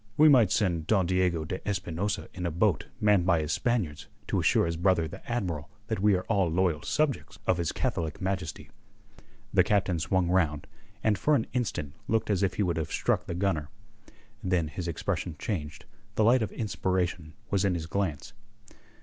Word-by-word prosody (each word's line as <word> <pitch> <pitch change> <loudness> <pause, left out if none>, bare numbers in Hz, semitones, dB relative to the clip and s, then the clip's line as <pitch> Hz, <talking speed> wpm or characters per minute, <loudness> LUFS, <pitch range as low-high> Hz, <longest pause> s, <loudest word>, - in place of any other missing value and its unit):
"We 155 +1 +8
might 120 -9 +6
send 85 -6 +1
Don 95 -5 +3
Diego 90 -3 +1
de 95 +4 -4
Espinosa 95 0 -2
in 90 -1 -3
a - - 0
boat 85 0 +1
manned 105 -4 +4
by 85 -2 +3
his 75 0 -2
Spaniards 95 -7 -1 0.2
to - - +1
assure - - +3
his 85 0 -1
brother 85 -1 +2
the - - -10
Admiral 85 -11 -2 0.2
that 110 - -1
we 105 0 +4
are 90 - -1
all 100 -6 +1
loyal 85 -2 +1
subjects 150 - -1
of 90 - +2
his 85 -3 0
Catholic 80 -2 -2
Majesty." 95 -4 -3 0.8
The - - +6
Captain 95 -4 +1
swung 90 +2 +1
round, 80 -5 +1 0.4
and 105 -3 +2
for 150 - +3
an 115 - +1
instant 100 - -2
looked 110 -1 +1
as 100 -2 +1
if 95 -2 +1
he 105 - +1
would 85 -3 0
have 80 -2 -3
struck - - 0
the 85 - -3
gunner. 90 -5 0 0.7
Then 90 -4 +1
his 85 +3 -5
expression 85 +1 -2
changed: 75 -2 -4 0.3
the 110 - +3
light 120 +3 +5
of 110 - -2
inspiration 90 -6 -2 0.2
Was 100 -1 +2
in 95 -2 +2
his 80 -2 -3
glance. 90 0 -2
90 Hz, 185 wpm, -28 LUFS, 80-100 Hz, 0.8 s, We